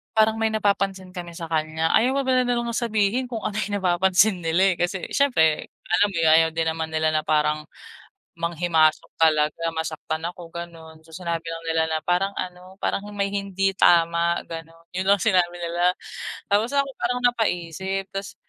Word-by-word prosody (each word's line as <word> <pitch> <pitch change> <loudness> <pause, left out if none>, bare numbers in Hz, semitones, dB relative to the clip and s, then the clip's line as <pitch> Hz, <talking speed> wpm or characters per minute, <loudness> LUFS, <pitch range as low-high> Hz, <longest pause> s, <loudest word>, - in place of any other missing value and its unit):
parang 220 0 +4
may 225 0 +2
napapansin 195 -3 0
kami 175 -1 -6
sa 165 0 -6
kanya. 160 +1 0
"Ayaw 255 +4 +3
pa - - -4
pala 255 -1 +3
nilang 240 -1 0
sabihin 220 +1 +1
kung 235 -3 -4
ano 205 - -3
yung 205 -1 -1
napapansin 185 +2 +3
nila 180 +3 +3
eh. - - -20
Kasi 175 +1 -1
siyempre 160 - +2 0.2
alam 175 +4 +3
mo - - -3
'yon, 165 - +3
ayaw 160 0 +5
din 165 0 -1
naman 160 0 -3
nila 155 0 +2
na 155 - +1
parang 150 0 +1 0.8
manghimasok 170 -2 +1
talaga. 155 0 +3
Masaktan 160 0 -4
ako, 175 -1 -9
ganoon. 165 -2 -9
So, 165 - -18
sinabi 170 -2 -3
lang 165 0 -6
nila 160 0 +2
na 160 - 0
parang 180 +3 +1
ano, 180 +1 -7
parang 200 - 0
may 200 -1 0
hindi 195 -1 0
tama, 170 -1 +4
ganon. 165 0 -9
'Yon 185 - 0
lang 200 0 +5
sinabi 180 -2 +3
nila. 175 +1 +1 0.6
Tapos 210 +4 +2
ako, 280 0 +2
parang 250 - 0
napaisip. 190 -4 -2
Tas 195 0 -5
175 Hz, 175 wpm, -24 LUFS, 165-200 Hz, 0.8 s, ayaw